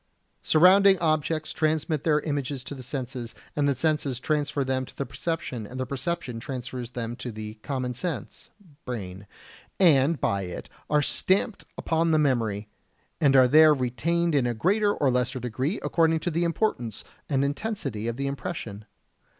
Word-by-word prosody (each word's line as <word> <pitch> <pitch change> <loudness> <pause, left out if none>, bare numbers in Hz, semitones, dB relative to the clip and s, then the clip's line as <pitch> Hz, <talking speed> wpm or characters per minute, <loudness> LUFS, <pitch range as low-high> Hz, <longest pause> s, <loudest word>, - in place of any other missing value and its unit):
Surrounding 190 +4 +6
objects 155 -1 0
transmit 155 -1 0
their 150 -2 +3
images 140 -3 -3
to - - -7
the 135 - -8
senses, 125 -3 -5 0.2
and 145 -1 +2
the 140 - +1
senses 140 -2 0
transfer 150 0 0
them 130 0 -1
to - - -12
the 140 - -2
perception, 130 -6 -4
and 130 +3 -8
the 130 - -1
perception 140 -2 -3
transfers 125 -1 -6
them 115 0 -3
to 125 0 -6
the 110 0 -8
"common 130 -2 -3
sense" 130 - -5 0.3
(brain), 100 -5 -6 0.5
and 155 -4 +4
by 100 0 0
it 90 -2 -7 0.2
they 150 - +1
are 150 - +4
stamped 195 +7 +1
upon 165 0 +1
the 160 - +4
memory, 115 -8 +1 0.5
and 140 -3 +4
are 130 -1 +7
there 155 +3 +7
retained 160 +7 0
in 135 -4 +2
a 120 - -1
greater 205 - +2
or 140 -9 +1
lesser 125 +1 0
degree 130 - -2
according 165 -1 +2
to 175 - -2
the 170 +2 0
importance 160 - -1 0.3
and 140 -1 +2
intensity 140 - -3
of 115 0 -3
the 140 - -2
impression. 120 -7 -5
140 Hz, 165 wpm, -26 LUFS, 125-160 Hz, 0.5 s, are